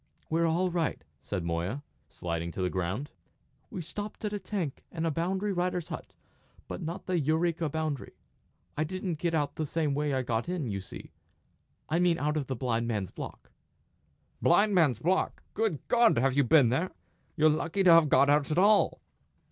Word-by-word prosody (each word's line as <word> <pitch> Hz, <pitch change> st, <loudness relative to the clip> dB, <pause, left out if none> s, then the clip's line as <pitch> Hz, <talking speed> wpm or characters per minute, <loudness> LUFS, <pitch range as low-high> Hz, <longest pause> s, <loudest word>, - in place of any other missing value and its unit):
"We're 165 Hz, +1 st, +2 dB
all 175 Hz, +3 st, +1 dB
right," 170 Hz, -3 st, -1 dB, 0.2 s
said 95 Hz, +2 st, -4 dB
Moya, 85 Hz, +11 st, -2 dB, 0.3 s
sliding 85 Hz, 0 st, -4 dB
to 95 Hz, -, -3 dB
the 90 Hz, -, 0 dB
ground; 95 Hz, +10 st, -3 dB, 0.6 s
"we 180 Hz, -, -5 dB
stopped 205 Hz, +6 st, -6 dB
at 210 Hz, -, -2 dB
a 205 Hz, -, -2 dB
tank 185 Hz, -7 st, -4 dB
and 165 Hz, -1 st, -3 dB
a 165 Hz, -, +1 dB
boundary 190 Hz, +6 st, -1 dB
rider's 180 Hz, -1 st, -1 dB
hut, 160 Hz, -, -7 dB, 0.5 s
but -, -, -6 dB
not 170 Hz, +4 st, -5 dB
the 180 Hz, -2 st, 0 dB
Eureka 160 Hz, +2 st, +1 dB
boundary. 155 Hz, -3 st, -3 dB, 0.6 s
I 155 Hz, -, 0 dB
didn't 180 Hz, 0 st, -3 dB
get 170 Hz, -1 st, 0 dB
out 145 Hz, -2 st, -1 dB
the 155 Hz, -, -1 dB
same 155 Hz, -1 st, 0 dB
way 150 Hz, +1 st, 0 dB
I 130 Hz, -1 st, 0 dB
got 120 Hz, +4 st, -2 dB
in, 180 Hz, -5 st, -2 dB
you 100 Hz, -4 st, -3 dB
see 95 Hz, -, -11 dB, 0.8 s
I 165 Hz, -, +1 dB
mean 175 Hz, -2 st, +3 dB
out 150 Hz, 0 st, 0 dB
of 145 Hz, -4 st, -2 dB
the 130 Hz, -, -2 dB
Blind 115 Hz, -1 st, -1 dB
Man's 105 Hz, -6 st, -2 dB
Block." -, -, -9 dB, 0.9 s
"Blind 205 Hz, +4 st, +4 dB
Man's 155 Hz, -, +4 dB
Block! 180 Hz, +10 st, 0 dB
Good 210 Hz, -9 st, -1 dB
God! 235 Hz, -, +4 dB
have 130 Hz, +2 st, +2 dB
you 140 Hz, -1 st, +4 dB
been 135 Hz, -2 st, +5 dB
there? 160 Hz, +10 st, 0 dB, 0.5 s
You're 155 Hz, +1 st, +5 dB
lucky 165 Hz, +5 st, 0 dB
to 180 Hz, -, +7 dB
have 165 Hz, -3 st, +7 dB
got 140 Hz, -, +5 dB
out 145 Hz, 0 st, +3 dB
at 155 Hz, -, -1 dB
all!" 205 Hz, +3 st, +4 dB
155 Hz, 190 wpm, -29 LUFS, 130-180 Hz, 0.9 s, to